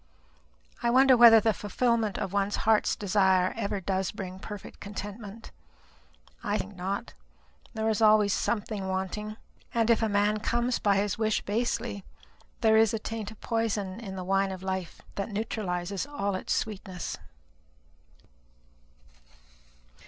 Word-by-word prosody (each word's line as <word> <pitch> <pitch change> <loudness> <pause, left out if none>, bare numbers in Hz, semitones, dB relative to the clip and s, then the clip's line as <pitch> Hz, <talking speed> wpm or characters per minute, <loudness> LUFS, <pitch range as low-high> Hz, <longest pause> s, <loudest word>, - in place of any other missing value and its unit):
I 235 - +2
wonder 260 +2 +6
whether 230 -2 +9
the 220 0 +2
fulfilment 220 0 0
of 195 -3 -3
one's 200 0 +1
heart's 220 -1 +3
desire 190 -2 +2
ever 205 -2 -2
does 190 0 -1
bring 185 -2 -7
perfect 205 0 -9
contentment? 205 +2 -8 0.9
I 205 +1 0
think 200 0 -6
not. 195 +5 -4 0.6
There 220 0 -1
is 220 0 +1
always 215 -2 +5
something 210 -3 -2
wanting. 190 +3 -3 0.4
And 230 0 +3
if 230 - +3
a 220 - +1
man 205 +1 +2
comes 240 +3 0
by 200 -1 +3
his 200 +1 0
wish 220 -1 +1
basely, 225 -1 -2 0.6
there 220 -2 +5
is 225 0 +4
a - - 0
taint 220 -1 -5
of 220 - -13
poison 220 -4 -1
in 195 -5 -7
the 185 - -5
wine 195 +1 +1
of 185 -1 -7
life 190 -2 -4
that 200 +2 -3
neutralizes 200 -1 -3
all 200 -9 -2
its 185 - -1
sweetness." 190 -4 -4
205 Hz, 140 wpm, -28 LUFS, 195-225 Hz, 0.9 s, whether